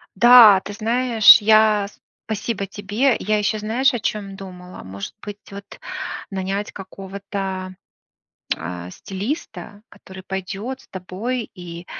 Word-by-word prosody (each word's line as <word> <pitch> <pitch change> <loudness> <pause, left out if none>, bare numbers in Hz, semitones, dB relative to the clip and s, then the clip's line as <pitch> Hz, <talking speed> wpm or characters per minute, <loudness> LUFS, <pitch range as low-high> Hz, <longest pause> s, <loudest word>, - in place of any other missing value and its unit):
Да, 230 -2 +8
ты - - -8
знаешь, 230 +1 +6
я 215 -1 +4 0.4
спасибо 220 -1 -3
тебе. 205 +6 0
Я 215 +2 0
ещё 210 +1 0
знаешь, 245 +6 +1
о 240 - -2
чём 200 -2 -3
думала, 180 -2 -11
может 100 +1 -8
быть 205 0 -8
вот 200 0 -11 0.5
нанять 195 +2 -3
какого-то, 195 -1 -6 0.8
а, 85 +2 -7
стилиста, 205 - -6
который 190 0 -13
пойдёт 195 +7 -5
с - - -22
тобой 210 +6 -5
и 175 -2 -9
200 Hz, 120 wpm, -21 LUFS, 190-220 Hz, 0.8 s, Да